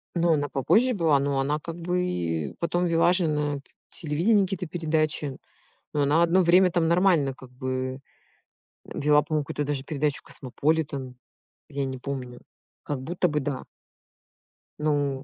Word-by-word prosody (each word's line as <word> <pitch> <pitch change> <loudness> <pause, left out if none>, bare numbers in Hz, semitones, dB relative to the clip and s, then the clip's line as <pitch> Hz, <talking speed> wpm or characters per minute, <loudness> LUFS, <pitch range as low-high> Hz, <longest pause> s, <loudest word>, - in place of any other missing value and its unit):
Ну 170 -1 +3
она 145 -1 0
попозже 235 - +3
была. 160 -7 +3
Но 140 0 0
она 145 +3 0
как 165 +2 -7
бы, 180 +1 -1
и, 80 - -2
потом 175 +1 0
вела 170 +1 +3
же 180 -2 +2
на 150 -1 0
п - - -17 0.3
телевидении 175 +7 +1
какие-то 185 -1 -3
передачи. 155 -4 0 0.6
Ну, 145 - +2
она 150 +4 +3
одно 170 +2 +4
время, 180 +2 +5
там, 170 -1 +1
нормально 170 -5 +3
как 130 -1 -14
бы, 130 0 -3 0.9
э, - - -14
вела 150 0 +4
помню 155 0 -1
какую-то 145 - -3
даже 140 -2 -2
передачу 145 -1 -1
Cosmopolitan. 140 -1 -2 0.5
Я 140 -1 -2
не 130 -1 -4
помню. 125 -2 -6 0.4
Как 145 -3 -4
будто 175 +5 0
бы 150 -2 0
да. 135 -1 -3 1.2
Ну. 145 -3 0
150 Hz, 160 wpm, -26 LUFS, 140-170 Hz, 1.2 s, время